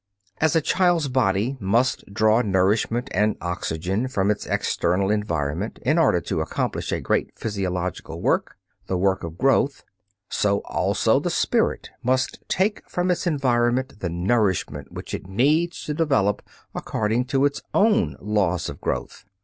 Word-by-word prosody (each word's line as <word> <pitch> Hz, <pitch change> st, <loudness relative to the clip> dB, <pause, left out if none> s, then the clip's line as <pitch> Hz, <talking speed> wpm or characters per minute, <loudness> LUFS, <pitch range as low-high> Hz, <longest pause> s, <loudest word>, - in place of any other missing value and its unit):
As 160 Hz, 0 st, +3 dB
the 165 Hz, -, +3 dB
child's 175 Hz, -3 st, +2 dB
body 120 Hz, 0 st, +1 dB
must 115 Hz, +2 st, 0 dB
draw 110 Hz, +2 st, +3 dB
nourishment 105 Hz, +4 st, +1 dB
and 105 Hz, +3 st, +2 dB
oxygen 90 Hz, +5 st, -2 dB
from 100 Hz, -6 st, +1 dB
its 105 Hz, -, -3 dB
external 95 Hz, +3 st, 0 dB
environment, 85 Hz, -2 st, -2 dB
in 150 Hz, +7 st, +2 dB
order 145 Hz, -, +4 dB
to -, -, -2 dB
accomplish -, -, -2 dB
a -, -, 0 dB
great -, -, -1 dB
physiological 90 Hz, -5 st, -3 dB
work, -, -, 0 dB, 0.3 s
the 95 Hz, -, 0 dB
work 95 Hz, +1 st, +1 dB
of 85 Hz, 0 st, -6 dB
growth, 135 Hz, +3 st, +2 dB, 0.4 s
so 100 Hz, -1 st, +1 dB
also -, -, +1 dB
the -, -, -2 dB
spirit -, -, 0 dB
must 130 Hz, +1 st, 0 dB
take 200 Hz, +3 st, 0 dB
from 180 Hz, +1 st, 0 dB
its 180 Hz, -, -1 dB
environment 130 Hz, -4 st, +1 dB
the 90 Hz, -, -2 dB
nourishment 90 Hz, -, 0 dB
which -, -, -8 dB
it -, -, -5 dB
needs 150 Hz, -, +1 dB
to 150 Hz, -, -2 dB
develop 135 Hz, -, +1 dB, 0.3 s
according 110 Hz, +3 st, -1 dB
to 135 Hz, +1 st, +2 dB
its 140 Hz, 0 st, -1 dB
own 220 Hz, +1 st, +3 dB
"laws 95 Hz, -5 st, 0 dB
of 70 Hz, -, -9 dB
growth." -, -, -4 dB
110 Hz, 150 wpm, -23 LUFS, 95-135 Hz, 0.4 s, order